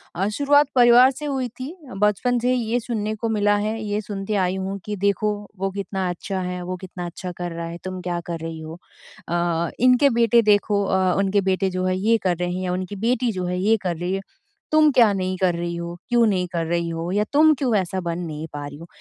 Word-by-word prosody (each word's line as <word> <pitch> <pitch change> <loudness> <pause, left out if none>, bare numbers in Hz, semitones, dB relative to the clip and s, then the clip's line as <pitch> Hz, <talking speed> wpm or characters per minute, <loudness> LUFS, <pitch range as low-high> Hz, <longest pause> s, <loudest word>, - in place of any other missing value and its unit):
अ, 190 +3 0
शुरुआत 285 +2 +4
परिवार 245 +1 +7
से 295 +3 -8
हुई 265 -3 -1
थी। 275 +7 -6 0.2
बचपन 210 +5 +2
से 250 +2 +1
ये 240 0 0
सुनने 220 -2 -3
को 225 +1 -3
मिला 205 -1 +2
है 215 +2 -2
ये 205 0 -1
सुनती 205 0 -5
आई 185 +1 -1
हूँ 190 +1 -3
कि 210 0 -3
देखो 200 +2 +1 0.3
वो 195 - 0
कितना 195 -1 -3
अच्छा 190 +2 -4
है 180 0 -4
वो 185 +1 -4
कितना 180 -1 -7
अच्छा 180 +1 -6
कर 175 -1 -4
रहा 165 0 -5
है 170 +1 -6
तुम 185 0 -5
क्या 175 -1 -2
कर 165 -1 -3
रही 165 0 -6
हो? 160 +2 -8 0.5
अ, 170 -1 0
इनके 255 +3 +5
बेटे 235 0 +5
देखो 205 -1 +3
अ, 190 -1 +2
उनके 195 +1 +2
बेटे 190 +1 +1
जो 185 0 -2
है 185 0 +1
ये 225 +4 +3
कर 180 -2 +1
रहे 175 0 -2
हैं 185 +1 -3
या 180 -1 -1
उनकी 185 +2 -4
बेटी 245 -1 +1
जो 185 -2 -3
है 180 0 -2
ये 220 +4 +3
कर 175 -2 -1
रही 175 +3 -2
है। 195 - -2 0.5
तुम 310 -1 +6
क्या 230 -4 +6
नहीं 185 -1 -2
कर 180 -2 +1
रही 170 0 -3
हो 170 0 -5
क्यों 240 -1 +4
नहीं 185 -3 0
कर 165 -1 -1
रही 170 0 -1
हो 165 +2 -3
या 205 +2 +2
तुम 310 +1 +6
क्यों 250 -5 +1
ऐसा 185 0 -2
बन 170 0 -3
नहीं 160 -2 -5
पा 145 -1 -5
रही 145 0 -8
हो 170 +2 -11
190 Hz, 240 wpm, -23 LUFS, 175-225 Hz, 0.5 s, परिवार